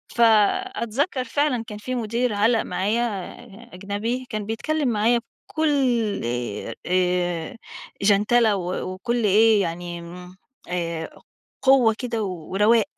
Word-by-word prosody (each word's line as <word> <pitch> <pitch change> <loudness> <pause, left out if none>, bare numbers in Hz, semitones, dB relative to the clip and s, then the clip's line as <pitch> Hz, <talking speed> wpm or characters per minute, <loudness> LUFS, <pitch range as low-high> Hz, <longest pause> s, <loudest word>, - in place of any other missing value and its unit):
فأتذكّر 240 - +2
فعلًا 255 -1 0
كان 210 -3 -7
في 255 +4 -4
مُدير 235 +1 -1
علّق 220 +2 +3
معايا 215 +5 -1 0.7
أجنبي 205 +7 -3
كان 215 -3 -3
بيتكلّم 285 +7 -1
معايا 230 +1 +2 0.3
بكل 305 -3 +1 0.4
آآ، 120 -3 -4
آآ، 180 +1 0 0.4
جَنتلة 210 +2 +4
و 180 -1 -3
وكل 235 +5 -2
إيه 215 +1 +5
يعني 175 0 -4
امم، 180 +2 -11 0.3
آآ، 170 -2 -4 0.4
قوّة 260 -4 +5
كده 235 -3 -2
و 180 -6 -6
ورَواق، 215 +3 +4
215 Hz, 115 wpm, -23 LUFS, 185-240 Hz, 0.7 s, إيه